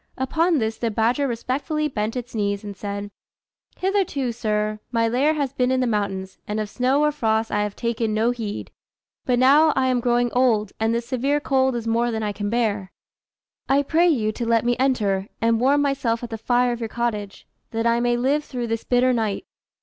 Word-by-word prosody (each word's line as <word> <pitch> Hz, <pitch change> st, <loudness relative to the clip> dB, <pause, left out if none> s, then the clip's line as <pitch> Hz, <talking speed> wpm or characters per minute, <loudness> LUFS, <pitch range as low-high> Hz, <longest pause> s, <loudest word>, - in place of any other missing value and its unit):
Upon 320 Hz, +6 st, +1 dB
this 220 Hz, -3 st, -2 dB
the 230 Hz, -, 0 dB
badger 235 Hz, +6 st, +1 dB
respectfully 285 Hz, +6 st, -2 dB
bent 220 Hz, -4 st, -3 dB
its 245 Hz, 0 st, -5 dB
knees, 200 Hz, -2 st, -1 dB
and 205 Hz, -1 st, -7 dB
said 200 Hz, +1 st, -5 dB, 0.7 s
"Hitherto, 370 Hz, -10 st, 0 dB
sir, 215 Hz, -2 st, -1 dB
my 230 Hz, -1 st, +2 dB
lair 270 Hz, +7 st, +2 dB
has 280 Hz, -3 st, -2 dB
been 250 Hz, -2 st, +1 dB
in 260 Hz, 0 st, +2 dB
the 255 Hz, -, +1 dB
mountains, 200 Hz, -4 st, -2 dB
and 210 Hz, +1 st, -2 dB
of 215 Hz, -1 st, -4 dB
snow 265 Hz, +4 st, +2 dB
or 300 Hz, -, +3 dB
frost 225 Hz, -5 st, 0 dB
I 210 Hz, -, +1 dB
have 210 Hz, -1 st, -3 dB
taken 230 Hz, -1 st, -1 dB
no 220 Hz, +3 st, +2 dB
heed; 225 Hz, -4 st, -5 dB, 0.5 s
but 250 Hz, -2 st, +2 dB
now 285 Hz, +5 st, +6 dB
I 260 Hz, 0 st, +2 dB
am 250 Hz, -1 st, +2 dB
growing 240 Hz, 0 st, +1 dB
old, 225 Hz, -5 st, +2 dB
and 220 Hz, +1 st, +1 dB
this 235 Hz, 0 st, -1 dB
severe 265 Hz, +4 st, 0 dB
cold 265 Hz, -2 st, +1 dB
is 235 Hz, -1 st, -3 dB
more 230 Hz, +1 st, +1 dB
than 220 Hz, -1 st, -2 dB
I 210 Hz, -, -1 dB
can 205 Hz, 0 st, -4 dB
bear. 210 Hz, -4 st, -1 dB, 0.8 s
I 280 Hz, +1 st, +4 dB
pray 330 Hz, +5 st, +3 dB
you 230 Hz, -10 st, +2 dB
to 235 Hz, -, -5 dB
let 230 Hz, 0 st, +2 dB
me 240 Hz, 0 st, +2 dB
enter 205 Hz, -8 st, +1 dB
and 230 Hz, 0 st, +2 dB
warm 285 Hz, +3 st, +3 dB
myself 250 Hz, -5 st, 0 dB
at 235 Hz, -, -6 dB
the -, -, -2 dB
fire 245 Hz, +2 st, +2 dB
of 240 Hz, -, -3 dB
your 225 Hz, -2 st, -4 dB
cottage, 215 Hz, -4 st, -3 dB, 0.2 s
that 225 Hz, 0 st, -2 dB
I 235 Hz, 0 st, +3 dB
may 240 Hz, 0 st, +1 dB
live 275 Hz, +5 st, +1 dB
through 245 Hz, -5 st, -5 dB
this 225 Hz, 0 st, -2 dB
bitter 250 Hz, +1 st, +3 dB
night." 220 Hz, -, -1 dB
235 Hz, 210 wpm, -23 LUFS, 220-260 Hz, 0.8 s, now